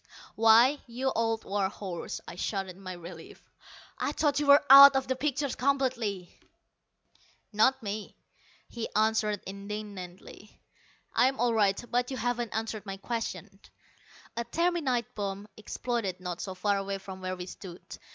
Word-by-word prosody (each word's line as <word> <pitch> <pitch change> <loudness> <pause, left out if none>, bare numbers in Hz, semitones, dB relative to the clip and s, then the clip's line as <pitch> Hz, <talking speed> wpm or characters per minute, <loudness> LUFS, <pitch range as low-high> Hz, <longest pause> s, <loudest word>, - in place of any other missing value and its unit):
"Why, 230 +6 +5
you 255 +3 -2
old 225 0 0
war 195 -1 0
horse," 190 -4 -6
I - - -7
shouted 190 0 -3
in 195 - -16
my 185 -1 -6
relief, 170 -1 -11 0.6
"I 285 - -1
thought 290 -2 +1
you 295 - -1
were 285 +1 +7
out 275 0 +11
of 265 -1 0
the 260 - 0
picture 285 +1 -1
completely!" 245 -9 -1 1.1
"Not 260 +4 +3
me," 205 0 -5 0.5
he 235 -2 -5
answered 215 -1 +1
indignantly. 200 -1 -8 0.5
"I'm 265 +1 +2
all 240 0 +2
right. 205 -3 +2
But 245 +1 +1
you 265 - -4
haven't 245 -3 -2
answered 220 -1 -4
my 195 0 -5
question." 230 +3 -5 0.8
A 235 - -2
terminite 275 -3 0
bomb 200 0 -4
exploded 215 -3 -3
not 180 -2 -5
so 190 -2 -5
far 200 +2 +1
away 195 0 -3
from 190 -1 -10
where 185 0 -3
we 180 -1 -7
stood. 180 -1 -10
215 Hz, 150 wpm, -29 LUFS, 195-250 Hz, 1.1 s, out